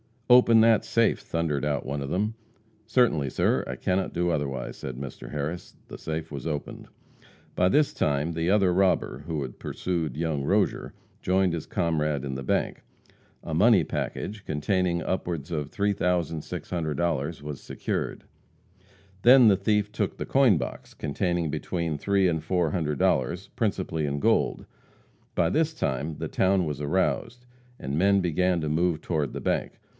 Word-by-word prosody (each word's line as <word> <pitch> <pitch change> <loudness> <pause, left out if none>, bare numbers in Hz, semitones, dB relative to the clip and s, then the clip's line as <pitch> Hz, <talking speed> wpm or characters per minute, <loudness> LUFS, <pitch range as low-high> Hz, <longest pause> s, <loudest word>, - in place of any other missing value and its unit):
"Open 115 -2 +7
that 115 -1 +5
safe!" 115 -1 +2
thundered 75 -4 -2
out 75 -2 -1
one 70 +1 -3
of 70 - -4
them. 105 +6 -1 0.5
"Certainly, 110 - +2
sir. - - +1
I 65 - -4
cannot 95 +7 -1
do 90 +1 0
otherwise," 70 -4 -3
said 65 - -6
Mr. 70 +1 -8
Harris. 75 +4 -5
The - - -8
safe 80 0 -5
was 70 -1 -5
opened. 75 -2 -5 0.7
By 90 - +2
this 145 +9 +3
time 75 +2 0
the 80 +1 -1
other 95 -3 +4
robber, 95 0 +1
who 80 -3 -2
had 65 -3 -7
pursued 85 -7 -3
young 80 -3 -1
Rozier, 100 +7 0 0.3
joined 95 0 +2
his 85 -2 -4
comrade 75 -5 -1
in 70 -2 -4
the 65 - -4
bank. - - -1 0.6
A - - -5
money - - +5
package, 105 -1 -4
containing 85 +3 0
upwards 85 -5 -3
of 75 -3 -2
$3,600, 85 -4 -1
was 75 -1 -6
secured. - - -4 1.0
Then 125 -1 +8
the 100 - +4
thief 105 +1 +1
took 105 -2 -2
the - - -4
coin 130 -9 +4
box, 65 - -6
containing 85 +2 -1
between 85 -2 -2
three 100 +3 +2
and 80 -2 -1
four 85 -1 0
hundred 75 -4 -1
dollars, 90 +7 0
principally 95 -8 -1
in 70 0 -2
gold. - - +1 0.7
By 85 -2 +2
this 160 - +1
time 75 - -2
the - - -4
town 95 -1 +2
was 75 -3 -4
aroused, 95 +9 -1 0.3
and 70 +2 -4
men 100 +3 +4
began 90 0 +1
to 75 - -2
move 80 +1 +1
toward 75 -5 -2
the - - -5
bank. - - -1
85 Hz, 160 wpm, -26 LUFS, 75-95 Hz, 1.0 s, Then